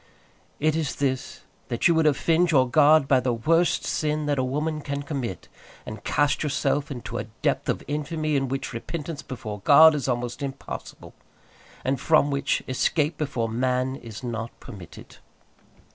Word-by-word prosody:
It 155 +1 +2
is 160 -3 -2
this, 130 -2 -2 0.3
that 120 - +1
you 170 - +4
would 160 -1 +3
offend 165 +4 +2
your 130 -5 +4
God 150 +2 +5
by 135 -2 +4
the 125 -1 0
worst 165 +9 +2
sin 150 0 -1
that 145 -2 0
a - - +1
woman 150 +4 -2
can 140 0 -4
commit, 135 - -5 0.4
and 110 -1 -8
cast 145 0 +1
yourself 145 0 0
into 125 -7 -5
a 105 - -4 0.2
depth - - 0
of - - -1
infamy 150 +1 -2
in 135 -1 +1
which 135 0 -4
repentance 150 +5 -5
before 110 -5 -7
God 155 +9 +7
is 145 -3 -2
almost 120 0 -2
impossible, 135 -1 -7 0.7
and 135 0 0
from 155 -2 +3
which 140 -1 0
escape 150 +4 +1
before 135 -6 -1
man 125 +3 0
is 115 -3 -10
not 115 -1 -4
permitted. 100 -9 -12
140 Hz, 160 wpm, -25 LUFS, 125-155 Hz, 0.7 s, God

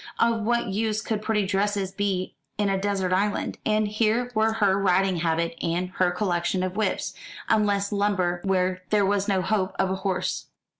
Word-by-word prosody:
Of 230 -1 +2
what 235 0 0
use 215 +2 0
could 220 -1 -2
pretty 215 -2 +1
dresses 200 0 0
be 195 -2 -2 0.2
in 205 -1 +1
a 195 - +1
desert 195 -2 0
island? 205 +3 0
And 215 0 +2
here 225 +3 +1
were 220 0 +2
her 205 -4 +3
riding 190 -1 +2
habit 165 0 0
and 175 +2 -1
her 185 -1 +4
collection 180 0 0
of 185 0 -3
whips 215 0 -1 0.4
useless 205 -1 +2
lumber 195 -4 0
where 185 -1 +1
there 210 -2 +3
was 200 0 +1
no 190 -3 +1
hope 195 -2 0
of 190 -1 +1
a - - 0
horse. 190 -1 -2
200 Hz, 180 wpm, -25 LUFS, 185-210 Hz, 0.4 s, her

